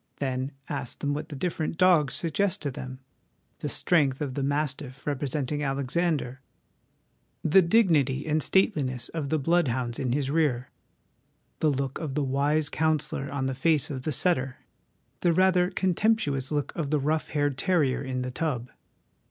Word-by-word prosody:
Then 130 0 -2
ask 120 - -4
them 145 0 -1
what 150 +2 -4
the 150 - -6
different 160 +1 -2
dogs 175 -6 +4
suggest 185 +4 0
to 145 - -1
them: 130 0 -8 0.6
the - - -3
strength 140 -7 +2
of 140 -3 -3
the 140 - -2
mastiff 140 -1 -2
representing 145 0 -2
Alexander; 140 -1 -1 1.0
the 190 +5 +6
dignity 160 - +3
and 155 0 +1
stateliness 140 - +1
of 155 -4 -4
the 155 - +2
blood 165 +3 +2
hounds 120 -1 -2
in 130 -2 -1
his 140 +1 0
rear; 140 -6 0 0.9
the 155 - +3
look 135 -1 -2
of 150 -4 -4
the 150 - +1
wise 145 +3 +1
counsellor 150 -3 0
on 140 -2 -2
the 135 - -1
face 150 +2 +1
of 130 -2 -4
the 155 - -2
setter; 130 -4 0 0.5
the 175 -2 +2
rather 180 0 +3
contemptuous 185 - +1
look 145 -1 -2
of 155 -4 -2
the 150 0 +2
rough 155 +3 0
haired 145 -2 0
terrier 150 -4 +1
in 130 -1 -3
the 125 - -4
tub. 125 -4 -3
145 Hz, 160 wpm, -27 LUFS, 130-160 Hz, 1.0 s, the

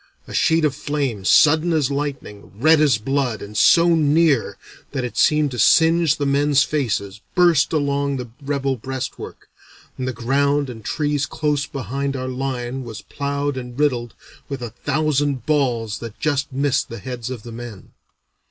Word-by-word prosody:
A - - -9
sheet 160 -1 +3
of 145 - +1
flame, 140 -10 -3
sudden 155 - +5
as 150 -4 +1
lightning, 140 -9 -5
red 155 +7 +4
as 140 -7 +4
blood, 125 -1 -1
and 105 +1 -10
so 170 +10 +5
near 155 -4 +2 0.4
that 130 -3 -2
it 125 - -5
seemed 150 -2 +3
to 120 - -5
singe 165 +4 +4
the 145 - -1
men's 140 0 +3
faces, 110 -8 -2
burst 175 -5 +4
along 140 -2 0
the 125 -2 -7
rebel 140 -1 -1
breastwork, 130 +2 -6 0.5
and 130 - -2
the - - 0
ground 140 +3 0
and 110 -2 -11
trees 145 +3 -1
close 145 -2 -1
behind 140 +2 -3
our 130 -1 -4
line 130 0 -4
was 115 -2 -8
ploughed 140 -1 -3
and 125 0 -7
riddled 125 -6 0 0.3
with 135 -3 -5
a 120 - -5
thousand 145 0 -1
balls 120 -8 0
that 115 -2 -9
just 145 -1 -1
missed 140 +1 0
the 115 - -7
heads 125 -2 -6
of 125 -5 -6
the 120 - -9
men. 115 -4 -9
140 Hz, 165 wpm, -21 LUFS, 120-145 Hz, 0.5 s, sudden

